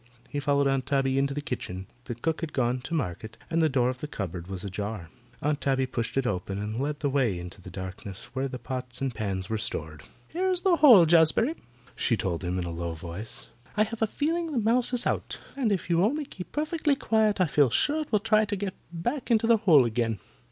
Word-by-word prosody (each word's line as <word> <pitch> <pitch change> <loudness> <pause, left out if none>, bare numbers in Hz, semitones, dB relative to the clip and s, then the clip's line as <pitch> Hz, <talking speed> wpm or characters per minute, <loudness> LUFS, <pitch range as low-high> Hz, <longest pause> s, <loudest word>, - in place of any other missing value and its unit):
He 145 - -2
followed 140 0 +2
Aunt 135 -1 0
Tabby 135 -1 +2
into 140 0 0
the 145 - -2
kitchen. 95 -8 -4 0.2
The 120 - -4
cook 160 +7 -2
had 165 -3 -4
gone 125 -1 +1
to 165 - -2
market 110 - -3
and 165 0 +2
the 160 - +4
door 130 -3 +2
of 125 0 -2
the 150 - -4
cupboard 90 - -5
was 95 -2 -5
ajar. 100 -2 -4 0.3
Aunt 145 0 0
Tabby 135 -1 +2
pushed 120 -1 -3
it 135 - +2
open 95 -3 -2
and 105 +3 -3
led 145 +1 -2
the 145 - +1
way 125 -9 +1
into 90 +2 -8
the 95 - -10
darkness 95 +1 -7
where 130 +1 -1
the 130 -1 -6
pots 125 +1 -5
and 135 -2 -1
pans 95 -4 -2
were 110 -1 -2
stored. 80 -7 -3 0.3
"Here's 365 +1 0
the 365 -3 +4
hole, 235 - +9
Jazbury," 170 - +4 0.4
she 115 - +1
told 90 -4 -2
him 90 +1 -1
in 90 - -2
a 85 - -4
low 85 0 -3
voice. 85 +6 -6 0.3
"I 215 - +5
have 220 +1 -6
a 220 - +3
feeling 325 +7 -1
the 280 - -2
mouse 235 +3 +2
is 245 -2 0
out, - - -1 0.2
and 255 -6 +1
if 190 -4 -1
you 170 0 +3
only 290 +8 +1
keep 180 -8 -9
perfectly 305 -1 +1
quiet 220 -5 +2
I 185 - +5
feel 145 -3 +3
sure 290 - +2
it 305 - -7
will 215 - +5
try 215 +1 +3
to 205 0 -2
get 195 -1 -3 0.2
back 240 - -3
into 230 -1 +3
the 230 0 +5
hole 165 - +6
again. 115 -1 0
135 Hz, 230 wpm, -27 LUFS, -, 0.4 s, hole